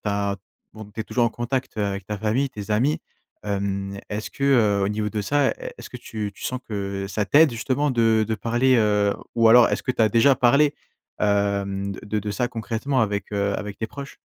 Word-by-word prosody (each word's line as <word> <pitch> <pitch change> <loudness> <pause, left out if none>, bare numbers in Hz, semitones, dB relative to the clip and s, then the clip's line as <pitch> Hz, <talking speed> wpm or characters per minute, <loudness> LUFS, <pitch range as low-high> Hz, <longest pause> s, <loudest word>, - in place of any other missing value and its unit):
as 100 0 -1 0.4
bon, 110 0 -9
tu - - -4
es - - 0
toujours 120 +2 0
en - - +3
contact 125 +3 -3
avec 100 -2 -2
ta 105 - -3
famille, 110 +7 0
tes 105 -4 -8
amis. 125 +9 +1 0.4
Hem, 100 -1 -3
est-ce 105 +1 -4
que, 140 - -4
heu, 110 -8 +3
au - - 0
niveau 105 0 -1
de 105 - -2
ça, 140 +6 +2
e - - -1 0.2
est-ce - - -11
que - - -7
tu 105 -2 -5
tu - - -11
sens 130 0 -3
que 100 -2 -3
ça 105 +2 -1
t'aide, 150 +7 +5
justement, 130 +5 -1
de 115 -3 +3
de 110 - -1
parler, 120 +4 +2
heu? 105 -2 +3 0.2
Ou 115 -1 +4
alors, 120 +1 +7
est-ce - - -1
que - - -1
tu 125 - -3
as 110 - +5
déjà 125 +5 +4
parlé, 140 +5 +4 0.5
hem, 100 -1 0
de 105 +2 -4
de 105 +1 -4
ça 105 +5 0
concrètement 115 +3 -2
avec, 105 -1 -1
heu, 100 0 0
avec 105 -1 -6
tes 110 - -4
proches? 140 +2 -9
110 Hz, 220 wpm, -23 LUFS, 100-125 Hz, 0.5 s, alors